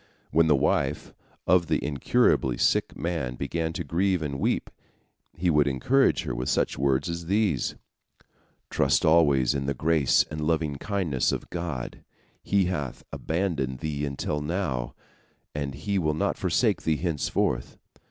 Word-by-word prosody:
When 80 Hz, 0 st, +4 dB
the 75 Hz, -, +5 dB
wife 70 Hz, +2 st, 0 dB, 0.3 s
of 90 Hz, -2 st, +3 dB
the -, -, +2 dB
incurably 65 Hz, -3 st, +2 dB
sick -, -, +1 dB
man 80 Hz, -8 st, -2 dB
began 80 Hz, +5 st, -2 dB
to 90 Hz, -, -3 dB
grieve 90 Hz, +3 st, 0 dB
and 70 Hz, -2 st, -4 dB
weep, -, -, -1 dB, 0.7 s
he 90 Hz, +1 st, +1 dB
would 75 Hz, -2 st, +3 dB
encourage 120 Hz, -, +2 dB
her -, -, -3 dB
with 60 Hz, +1 st, -3 dB
such -, -, +1 dB
words 70 Hz, +2 st, +1 dB
as 85 Hz, -1 st, -5 dB
these: 100 Hz, -, +1 dB, 1.0 s
"Trust 75 Hz, +6 st, +2 dB
always 70 Hz, -5 st, +4 dB
in 70 Hz, -1 st, -2 dB
the 70 Hz, -, -1 dB
grace 80 Hz, 0 st, +3 dB
and 75 Hz, 0 st, -4 dB
lovingkindness 80 Hz, -1 st, 0 dB
of -, -, -5 dB
God. 85 Hz, -8 st, -5 dB, 0.4 s
He 100 Hz, -2 st, +2 dB
hath 75 Hz, -8 st, -3 dB
not -, -, -7 dB
abandoned 80 Hz, -7 st, -1 dB
thee 75 Hz, -2 st, -3 dB
until 75 Hz, +1 st, -2 dB
now, 75 Hz, -6 st, -2 dB, 0.6 s
and 70 Hz, -2 st, -3 dB
He 95 Hz, +8 st, -1 dB
will 75 Hz, -3 st, 0 dB
not -, -, 0 dB
forsake -, -, +1 dB
thee 80 Hz, -2 st, +1 dB
henceforth. 75 Hz, -7 st, -1 dB
75 Hz, 150 wpm, -26 LUFS, 70-85 Hz, 1.0 s, the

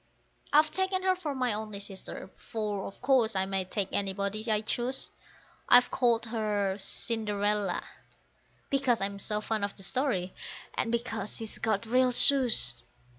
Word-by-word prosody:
I've 305 Hz, +1 st, +5 dB
taken 380 Hz, 0 st, 0 dB
her 375 Hz, 0 st, +3 dB
for 315 Hz, -6 st, -4 dB
my 250 Hz, -3 st, 0 dB
only 215 Hz, -1 st, -5 dB
sister, 195 Hz, -1 st, -6 dB
for 210 Hz, -3 st, -4 dB
of 195 Hz, -, -13 dB
course 255 Hz, -5 st, +3 dB
I 190 Hz, 0 st, +2 dB
may 190 Hz, -1 st, -1 dB
take 195 Hz, +1 st, -2 dB
anybody 200 Hz, +3 st, -1 dB
I 210 Hz, -1 st, +2 dB
choose; 245 Hz, +4 st, -2 dB, 0.6 s
I've 245 Hz, 0 st, +7 dB
called 235 Hz, -2 st, +2 dB
her 210 Hz, -4 st, -1 dB
Cinderella, 205 Hz, -2 st, -1 dB, 0.9 s
because 270 Hz, -4 st, +2 dB
I'm 200 Hz, 0 st, -2 dB
so 210 Hz, +1 st, -1 dB
fond 215 Hz, -1 st, -2 dB
of 200 Hz, -, -2 dB
the 195 Hz, -, -6 dB
story, 195 Hz, -6 st, -1 dB, 0.4 s
and 230 Hz, -, -1 dB
because 225 Hz, -3 st, -2 dB
she's 225 Hz, -1 st, -5 dB
got 215 Hz, 0 st, 0 dB
real 250 Hz, +2 st, +3 dB
shoes. 240 Hz, -, +5 dB
220 Hz, 150 wpm, -29 LUFS, 200-250 Hz, 0.9 s, I've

